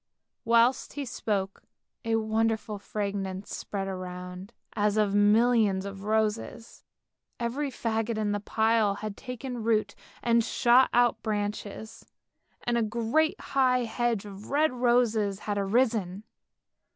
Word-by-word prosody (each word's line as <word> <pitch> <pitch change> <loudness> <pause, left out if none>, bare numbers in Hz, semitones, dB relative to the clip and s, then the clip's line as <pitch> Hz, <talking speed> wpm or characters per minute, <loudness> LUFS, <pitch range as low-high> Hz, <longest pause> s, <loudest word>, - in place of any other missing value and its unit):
Whilst 235 +3 +3
he 285 -1 -4
spoke 200 -5 -3 0.4
a 225 0 0
wonderful 220 -1 0
fragrance 200 -2 -4
spread 195 -1 -4
around, 180 +1 -7 0.2
as 210 0 +1
of 210 -2 +2
millions 205 -1 +3
of 200 0 -7
roses. 220 +2 -2 0.6
Every 255 +5 -2
faggot 225 -2 -2
in 210 -1 0
the 205 - -1
pile 220 -1 +2
had 210 0 -6
taken 250 0 -6
root 215 -2 +1 0.3
and 235 -1 +3
shot 245 +2 +4
out 240 0 +3
branches, 210 0 -4 0.6
and 240 0 +1
a - - +1
great 235 - +1
high 255 -2 +2
hedge 235 -2 -1
of 200 0 -10
red 295 0 +2
roses 235 -5 +1
had 205 -1 -2
arisen. 205 -2 0
220 Hz, 125 wpm, -28 LUFS, 205-235 Hz, 0.6 s, shot